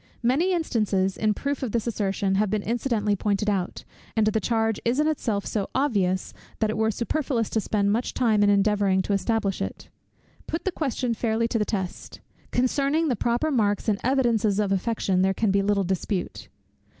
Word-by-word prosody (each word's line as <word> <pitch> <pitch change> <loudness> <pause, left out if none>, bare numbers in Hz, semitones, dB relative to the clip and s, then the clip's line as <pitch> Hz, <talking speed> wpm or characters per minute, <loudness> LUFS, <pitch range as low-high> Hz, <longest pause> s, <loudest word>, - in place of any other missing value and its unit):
Many 285 +10 +2
instances, 210 - 0
in 215 -1 +1
proof 280 +4 -3
of 250 -6 -3
this 230 -2 0
assertion, 200 -3 -1
have 205 +1 +2
been 210 0 -1
incidentally 225 -3 0
pointed 205 +1 0
out, 190 -3 -3 0.3
and 220 -1 +3
the 215 +1 +2
charge 225 -2 0
is 240 +4 +1
in 300 - +3
itself 225 -10 -1
so 200 -3 -2
obvious, 200 -9 0 0.2
that 220 -1 +1
it - - -4
were 220 0 +2
superfluous 235 +1 -1
to 220 - +1
spend 200 -1 0
much 235 +4 -1
time 220 -4 +2
in 205 - +4
endeavouring 200 -1 +3
to 200 - -1
establish 200 -1 0
it. - - -5 0.6
Put 325 - -4
the 380 - +1
question 265 -7 -1
fairly 230 0 0
to 230 - 0
the 210 - +1
test. 190 -4 -4 0.3
Concerning 280 +5 +1
the 250 - +1
proper 240 +8 0
marks 205 -6 +1
and 205 -2 +1
evidences 235 -6 +2
of 205 -2 0
affection, 195 -2 0
there 190 0 +2
can 215 -1 +1
be 200 0 +3
little 200 0 +1
dispute. 190 +1 -3
215 Hz, 185 wpm, -25 LUFS, 200-240 Hz, 0.6 s, in